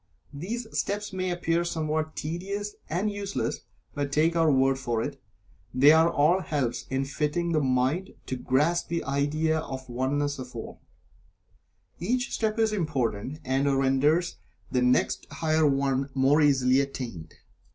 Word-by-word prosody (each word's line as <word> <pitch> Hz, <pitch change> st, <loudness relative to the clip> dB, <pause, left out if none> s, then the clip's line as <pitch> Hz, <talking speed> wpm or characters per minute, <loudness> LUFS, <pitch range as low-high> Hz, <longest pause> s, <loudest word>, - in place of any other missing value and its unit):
These 215 Hz, +12 st, -4 dB
steps 205 Hz, 0 st, -2 dB
may 185 Hz, 0 st, -1 dB
appear 170 Hz, -1 st, 0 dB
somewhat 155 Hz, -2 st, -2 dB
tedious 200 Hz, +6 st, -4 dB, 0.2 s
and 185 Hz, +6 st, 0 dB
useless, 200 Hz, -1 st, -3 dB, 0.3 s
but 145 Hz, -1 st, -2 dB
take 160 Hz, +4 st, +2 dB
our 165 Hz, -2 st, +4 dB
word 135 Hz, 0 st, +3 dB
for 120 Hz, -3 st, -1 dB
it, -, -, -6 dB, 0.5 s
they 140 Hz, +3 st, +7 dB
are 160 Hz, +1 st, +5 dB
all 170 Hz, +3 st, +3 dB
helps 130 Hz, -8 st, -2 dB
in 135 Hz, +1 st, 0 dB
fitting 150 Hz, +5 st, -1 dB
the 155 Hz, -, +3 dB
mind 130 Hz, +8 st, 0 dB
to 130 Hz, -, -3 dB
grasp 150 Hz, +7 st, +1 dB
the 170 Hz, 0 st, -2 dB
idea 150 Hz, +3 st, 0 dB
of 130 Hz, -4 st, -6 dB
the 125 Hz, -, -12 dB
Oneness 145 Hz, +3 st, -1 dB
of 125 Hz, -1 st, -8 dB
All. 115 Hz, -, -8 dB, 1.2 s
Each 245 Hz, +8 st, -1 dB
step 220 Hz, -1 st, 0 dB
is 220 Hz, -1 st, +2 dB
important, 140 Hz, -, -2 dB
and 135 Hz, +2 st, +1 dB
renders 145 Hz, +6 st, +2 dB, 0.3 s
the 125 Hz, -, +1 dB
next 125 Hz, 0 st, +2 dB
higher 155 Hz, +2 st, +1 dB
one 135 Hz, -1 st, +1 dB
more 135 Hz, +3 st, +4 dB
easily 135 Hz, -3 st, +4 dB
attained. 125 Hz, -12 st, -6 dB
150 Hz, 150 wpm, -27 LUFS, 135-170 Hz, 1.2 s, they